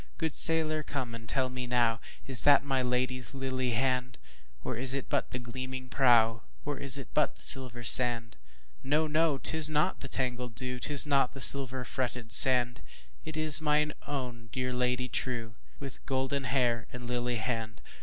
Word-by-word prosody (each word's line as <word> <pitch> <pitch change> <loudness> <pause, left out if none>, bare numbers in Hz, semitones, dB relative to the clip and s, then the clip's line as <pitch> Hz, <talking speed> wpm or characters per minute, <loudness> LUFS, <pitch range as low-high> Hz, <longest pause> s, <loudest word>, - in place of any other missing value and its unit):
Good 160 -4 -4
sailor 155 -1 +2
come 130 -5 -6
and 115 -1 -11
tell 130 -2 -1
me 125 -1 -7
nowIs 120 +1 -1
that 145 0 +4
my 135 -2 -2
Lady's 125 +1 -2
lily 130 -1 -4
hand? 125 +1 -2 0.5
Or - - -5
is 130 +3 0
it 140 - -6
but - - -2
the - - -6
gleaming 130 +1 -8
prow, 115 -4 +2 0.2
Or 145 -1 -5
is 140 -1 +5
it 135 - -9
but 150 - -1
the - - 0
silver 125 -3 0
sand? 115 0 +2 0.5
No! 150 +3 0
no! 155 -1 0
'tis 155 +2 +3
not 155 +4 -1
the 135 - -8
tangled 125 -2 -4
dew,'Tis 125 +4 +3
not 140 -4 0
the - - -9
silver 130 -1 +5
fretted 120 -2 -5
sand, 125 -2 +6 0.4
It 155 0 -7
is 155 -1 +8
my 150 0 0 0.2
own 125 -5 -7
dear 125 -1 -4
Lady 125 0 -2
trueWith 120 +2 -7
golden 135 +1 -3
hair 120 -3 -1
and 125 0 -10
lily 125 0 -4
hand! 115 -1 -5
130 Hz, 165 wpm, -28 LUFS, 120-140 Hz, 0.5 s, is